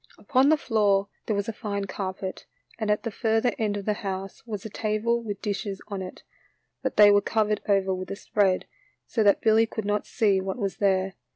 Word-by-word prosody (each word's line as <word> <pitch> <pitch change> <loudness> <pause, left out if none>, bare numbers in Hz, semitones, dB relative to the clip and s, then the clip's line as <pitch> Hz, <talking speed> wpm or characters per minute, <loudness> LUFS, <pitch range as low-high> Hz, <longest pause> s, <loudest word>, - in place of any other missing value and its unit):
Upon 265 +2 +3
the 315 - +5
floor 205 -6 +2 0.2
there 215 - +1
was 200 0 -1
a 225 - -3
fine 200 -3 -3
carpet, 190 -1 -5 0.3
and 215 -2 -1
at 210 - +1
the 230 - -3
further 225 +2 +1
end 210 -2 0
of 200 - -6
the 210 - +2
house 195 -1 -5
was 210 -3 -5
a - - -4
table 220 +3 0
with 205 -3 -6
dishes 200 -1 -3
on 200 -2 -4
it, 185 - -8 0.6
but - - -3
they 205 -1 +9
were 205 0 +5
covered 215 0 0
over 195 -1 +3
with 185 0 -5
a - - -3
spread, 195 -2 +1 0.4
so 230 - -1
that 205 -2 +4
Billy 225 0 +4
could 220 -2 -5
not 205 0 -1
see 200 -5 +2
what 190 +3 -4
was 200 -5 -2
there. 190 -1 +1
205 Hz, 210 wpm, -26 LUFS, 195-220 Hz, 0.6 s, they